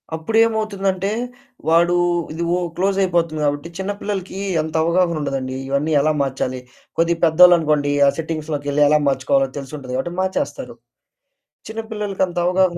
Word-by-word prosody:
అప్పుడేమవుతుందంటే 200 0 0 0.6
వాడు 170 +2 +4 0.4
ఇది 165 +2 -3
ఒ - - 0 0.2
క్లోజయిపోతుంది 180 -4 +1
కాబట్టి, 145 +3 -1
చిన్న 190 +1 -2
పిల్లలకి 195 -2 -4 0.2
అంత 155 0 -6
అవగాహనుండదండి. 150 -7 0
ఇవన్నీ 140 +3 0
ఎలా 155 - +2
మార్చాలి? 130 -1 -2 0.4
కొద్దిగా 170 0 +1
పెద్దోళ్ళనుకోండి 160 -4 +5 0.2
ఆ - - +6
సెట్టింగ్స్‌లోకెళ్లి 150 -3 -2
ఎలా 150 +1 +4
మార్చుకోవాలో 135 0 +2
తెలిసుంటది 135 -2 -7
కాబట్టి 155 +7 -3
మార్చేస్తారు. 190 +10 -3 0.9
చిన్నపిల్లలకంత 210 -5 -3
అవగాహన 180 -1 +2
170 Hz, 115 wpm, -20 LUFS, 145-190 Hz, 0.9 s, ఆ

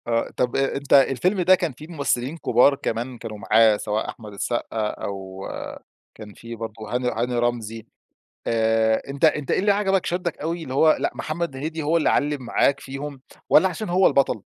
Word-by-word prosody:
آآ، 115 -1 0
طب 125 -1 0
أنتً 135 0 +4
الفيلم 180 - 0
ده 185 +2 +6
كان 175 -4 -2
فيه 150 +5 -12
ممثلين 140 -2 -2
كبار 130 -1 +4
كمان 120 0 -4
كانوا 110 -2 -7
معاه، 110 +1 +4
سواء 105 +1 -2
أحمد 105 -3 -9
السقا 110 +1 -2
أو 95 -2 -6 0.7
كان 105 -2 -11
في 115 +3 -9
برضه 115 -1 -6 0.2
هاني 125 0 0
هاني 120 +1 -1
رمزي. 115 -2 -2 0.6
آآ، 110 -1 +2
أنت 140 +3 -2
أنت 150 -3 +2
إيه - - +2
اللي 205 +1 +3
عجبك 195 -2 +1
شدَّك 175 -1 -2
أوي؟ 165 +2 -3
اللي 130 -4 -6
هو 155 +3 +5
لأ، - - 0
محمد 155 -2 -4
هنيدي 160 +4 -4
هو 155 +3 +1
اللي 165 - +2
علّم 145 -1 0
معاك 135 +3 +1
فيهم، 135 0 -7 0.3
والّا 190 +5 +6
عشان 185 +3 -5
هو 185 +2 +4
البطَل؟ 135 -6 +2
135 Hz, 180 wpm, -23 LUFS, 115-160 Hz, 0.7 s, ده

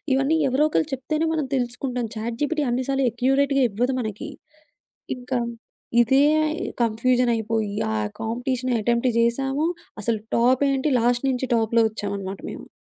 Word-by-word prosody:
ఇవన్నీ 275 +4 +2
ఎవరో 280 +4 +3
ఒకళ్ళు 310 0 0
చెప్తేనే 305 +5 -1
మనం 300 -4 -1
తెలుసుకుంటాం. 245 -1 -2
చాట్‌జీపిటీ 290 +8 -1
అన్ని 255 +1 -1
సార్లు 270 -1 +1
ఎక్యురేట్‌గా 270 +3 +2
ఇవ్వదు 245 +5 0
మనకి. 215 -2 -5 0.9
ఇంకా 250 0 -2 0.6
ఇదే 265 +4 +4 0.6
కన్ఫ్యూజన్ 245 +2 +2
అయిపోయి 220 -2 -2 0.2
ఆ - - -1 0.3
కాంపిటీషన్ 250 +2 -2
అటెంప్ట్ 235 +3 +1
జేశాము. 270 +6 +1 0.4
అసలు 220 0 0 0.2
టాప్ 250 +3 +3
ఏంటి, 270 +3 0
లాస్ట్ 240 +2 +1
నుంచి 260 0 -1
టాప్‌లో 230 +1 +2
ఒచ్చామన్నమాట 200 -2 -5
మేము. - - -9
250 Hz, 130 wpm, -23 LUFS, 230-270 Hz, 0.9 s, ఇదే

